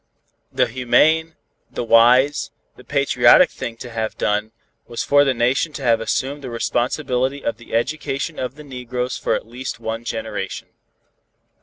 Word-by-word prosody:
The - - +2
humane, 155 +7 +2 0.3
the - - -4
wise, 125 +5 +4 0.3
the 125 - -15
patriotic 140 +4 +4
thing 115 -1 -6
to 120 +1 -9
have 110 -1 -3
done, 105 +1 0 0.4
was 120 - -4
for 145 0 +5
the 135 -2 +1
Nation 130 +6 +1
to 140 - -7
have 115 -2 +3
assumed 135 +5 -2
the 130 - -7
responsibility 125 +3 -1
of 115 - -1
the 120 - -7
education 140 +4 -2
of 130 0 -4
the 150 - -11
negroes 125 -2 -4
for - - 0
at - - -4
least 120 +1 -6
one 115 0 -4
generation. 110 -4 -5
125 Hz, 155 wpm, -21 LUFS, 115-140 Hz, 0.4 s, for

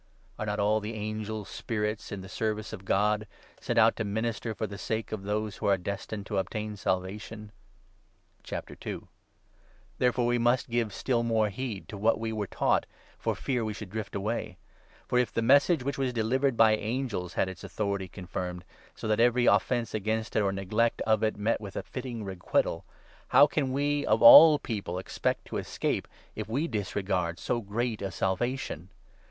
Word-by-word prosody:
Are 105 - -3
not 105 0 -1
all 105 +2 +3
the 110 +2 -5
angels 110 0 -4
spirits 105 -1 -3
in 100 -2 -5
the 95 - -9
service 110 +2 -3
of 100 -3 -8
God, 105 +2 +1 0.3
sent - - -2
out - - +6
to - - -3
14 100 - -4
minister 110 0 -2
for - - -2
the 100 -1 -7
sake 110 +1 -3
of 110 -2 -3
those 105 +1 -2
who - - -2
are 100 -1 +4
destined 100 +2 -5
to 100 -2 -1
obtain 105 +2 -3
Salvation? 105 +3 -3 2.5
Therefore 125 -1 +2
we 120 0 +2
must 120 +1 +2
give 115 -2 0
still 120 +4 0
more 110 -2 +2
heed 110 -2 -5
to 105 - -7
what 110 +2 +3
we 110 0 -2
were 105 -2 -2
i - - -13
taught, - - +2 0.3
for - - -1
fear 125 -4 -1
we 110 -1 -3
should 105 -3 -8
drift 110 0 -5
away. 105 +4 -3 0.5
For, 125 - +2
if 125 -3 +1
the 115 - -1
Message 140 +5 +5
2 - - -8
which 140 0 -2
was 130 -2 +1
delivered 125 +3 +1
by 110 -1 +6
angels 110 -5 -3
had - - +2
its 95 -3 -8
authority 100 -3 -2
confirmed, 90 -1 -6 0.3
so - - -5
that 110 0 +2
every 120 +1 +4
offence 120 -2 +2
against 110 +1 -2
it, - - +4
or 100 -1 +1
neglect 105 +4 0
of 110 -1 +2
it, 110 -1 0
met 105 +3 0
with 100 -2 -8
a - - -3
fitting 125 -4 -6
requital, 95 -3 -1 0.4
how - - +7
can 145 -2 -1
we, 145 +2 +1
of - - +3
all 280 - +11
people, 100 -9 -4
expect 95 - -2
to - - -4
escape, - - -2 0.3
if 110 0 -4
3 110 - -7
we 155 +5 +1
disregard 95 - -1
so 120 +8 -1
great 110 +2 -2
a 100 - -2
Salvation 95 - -2
110 Hz, 190 wpm, -29 LUFS, 100-120 Hz, 2.5 s, all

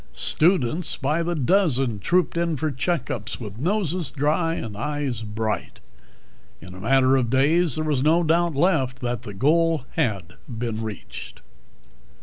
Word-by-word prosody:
Students 165 -1 +1
by 155 +3 0
the 170 +1 -1
dozen 135 - +2
trooped 175 - +1
in 170 -2 0
for 155 +2 -1
checkups 135 - -3
with 105 -2 -8
noses 180 - -1
dry 155 +3 0
and 110 -8 -5
eyes 145 0 -3
bright. 110 0 -3 0.8
In 90 +2 -11
a 90 - -10
matter 130 +5 +3
of 120 -3 0
days 150 +4 +3
there 155 - -1
was 145 -4 +1
no 160 +4 +3
doubt 170 0 +2
left 135 -6 +1
that 120 -2 -2
the 105 - -8
goal 160 +4 +2
had 95 -7 -2
been 115 -2 -3
reached. 110 -5 -8
140 Hz, 145 wpm, -24 LUFS, 115-165 Hz, 0.8 s, matter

